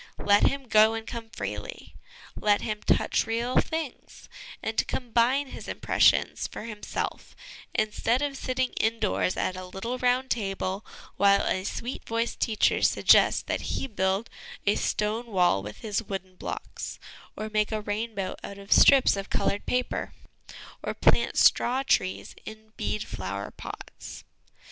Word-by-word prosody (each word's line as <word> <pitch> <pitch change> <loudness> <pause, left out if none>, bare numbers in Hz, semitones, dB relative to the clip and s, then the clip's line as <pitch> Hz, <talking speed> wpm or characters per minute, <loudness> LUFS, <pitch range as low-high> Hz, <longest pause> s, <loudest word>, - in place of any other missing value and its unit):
Let 205 0 +6
him 275 -2 -2
go 220 0 +5
and 225 0 -5
come 230 -1 -7
freely, - - -6 0.4
let 205 -1 +2
him 215 -1 -3
touch - - +1
real 235 +3 0
things, 320 -5 -5 0.4
and 220 0 0
combine 250 +3 +1
his - - -9
impressions - - +2
for - - -8
himself, 215 -2 -5 0.4
instead 220 +4 +1
of 285 -1 -2
sitting 255 -1 -1
indoors 220 -4 0
at 185 - -1
a 185 - -6
little 230 +7 -4
round 250 +1 +1
table, 195 -2 -2 0.3
while 200 0 +5
a 185 - 0
sweet 245 +5 -4
voiced 230 +1 -1
teacher 220 -2 +2
suggests - - +5
that - - -2
he - - -2
build 200 -2 0 0.4
a 205 - +4
stone 215 +4 -1
wall 180 - +2
with 105 +2 -9
his 215 -1 -1
wooden 190 -3 -6
blocks, - - -6 0.4
or 215 0 -5
make 215 0 +1
a 215 - -1
rainbow 205 -2 -3
out 200 - -7
of 200 0 -12
strips 275 -5 +7
of 195 0 -5
coloured 200 - -1
paper, 250 0 -1 0.7
or - - -4
plant - - +3
straw 255 +2 +4
trees 185 -8 0
in 220 0 -11
bead 215 - -2
flower 100 +1 -5
pots. - - -9
215 Hz, 145 wpm, -27 LUFS, 200-240 Hz, 0.7 s, strips